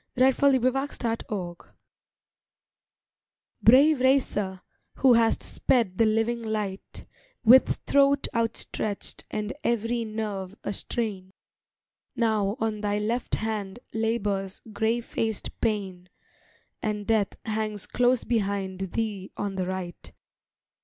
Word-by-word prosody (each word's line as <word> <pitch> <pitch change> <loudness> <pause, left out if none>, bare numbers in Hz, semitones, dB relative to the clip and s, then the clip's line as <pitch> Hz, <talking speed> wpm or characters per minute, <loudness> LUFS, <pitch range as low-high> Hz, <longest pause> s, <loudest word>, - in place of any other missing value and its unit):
SONNETS 260 0 +4 0.2
THE 255 -2 0
TORCH 180 -5 -4
RACE - - -24 1.9
Brave 275 +5 +6
racer, 210 -8 +1 0.3
who 260 -2 +5
hast 230 -1 +3
sped 225 -8 0
the 225 - +5
living 225 +2 +1
light 210 -3 -4 0.4
With 255 +4 +7
throat 280 0 +3
outstretched 225 -2 -2
and 210 +2 -3
every 235 0 0
nerve 210 -3 -4
a 205 - -2
strain, 195 -4 -3 0.8
Now 215 -2 +1
on 215 -1 -1
thy 205 -1 0
left 225 +4 -1
hand 215 -2 -3 0.2
labors 205 -4 -1
gray 220 +3 +1
faced 225 -2 -2
Pain, 190 -5 -2 0.7
And 210 -1 -2
Death 220 -3 +1
hangs 215 -2 -2
close 245 0 +2
behind 200 -4 -1
thee 210 -4 -3
on 205 -1 -2
the 185 -1 -2
right. 185 -2 -6
220 Hz, 110 wpm, -26 LUFS, 200-235 Hz, 1.9 s, With